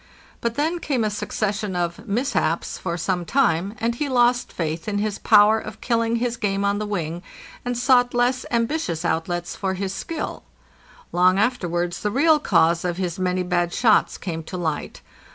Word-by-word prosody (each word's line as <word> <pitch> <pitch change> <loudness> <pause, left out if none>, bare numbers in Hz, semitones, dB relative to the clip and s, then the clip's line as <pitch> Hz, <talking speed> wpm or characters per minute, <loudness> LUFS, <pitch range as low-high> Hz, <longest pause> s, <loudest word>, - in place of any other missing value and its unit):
But 235 0 -1
then 320 +5 0
came 265 -8 -1
a 215 - 0
succession 210 -1 -2
of 175 +5 -3
"mishaps" 200 - -1
for 170 - -3
some 180 +1 -1
time, 200 -3 +1
and 230 +1 0
he 285 +4 -3
lost 245 -1 +2
faith 160 +1 -3
in 205 -1 -1
his 205 0 -2
power 215 0 +5
of - - -9
kill 230 -2 +1
ing 230 0 0
his 240 0 -1
game 200 -2 -1
on 200 0 +1
the 215 - -3
wing, 175 -4 -3 0.4
and 245 -1 -2
sought 245 -1 +3
less 245 +1 +2
ambitious 230 - -1
outlets 175 +2 -2
for 190 -1 -2
his 190 0 -3
skill. 325 +8 -5 0.7
Long 180 +2 +4
afterwards 175 -6 0
the 210 - 0
real 300 +7 +4
cause 170 - +3
of 175 -1 -2
his 180 -2 -3
many 185 0 0
bad 175 -1 0
shots 225 -4 +3
came 165 -3 -4
to 185 - -6
light. 160 -4 -3
205 Hz, 180 wpm, -23 LUFS, 175-240 Hz, 0.7 s, power